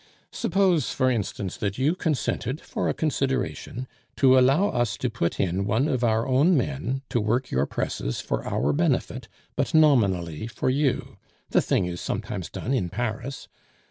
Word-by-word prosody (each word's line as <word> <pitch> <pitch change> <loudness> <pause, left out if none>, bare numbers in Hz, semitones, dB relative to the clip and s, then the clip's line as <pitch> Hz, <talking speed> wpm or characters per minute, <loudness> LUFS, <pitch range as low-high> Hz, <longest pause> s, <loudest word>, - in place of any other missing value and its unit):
Suppose, 185 -8 +2
for 130 0 +2
instance, 100 -4 -3
that 100 -1 -2
you 140 +5 +2
consented 145 -5 -1
for - - -3
a - - +1
consideration 135 -3 -2 0.3
to 130 -1 +5
allow 135 +10 +4
us 120 -3 0
to 125 - -2
put 85 -7 -2
in 95 +1 0
one 110 +8 +1
of 130 -5 0
our 115 0 +2
own 145 +7 +4
men 125 - -2
to 120 - +1
work 120 +5 0
your 65 +2 +1
presses - - -3
for - - -2
our 70 +4 0
benefit, - - 0 0.3
but - - -1
nominally 100 - +3
for 120 - -1
you; 140 0 -1 0.3
the - - +4
thing - - +1
is 90 0 -5
sometimes - - -4
done 130 - -3
in 95 -10 0
Paris. 120 +6 -4
125 Hz, 165 wpm, -25 LUFS, 100-135 Hz, 0.3 s, to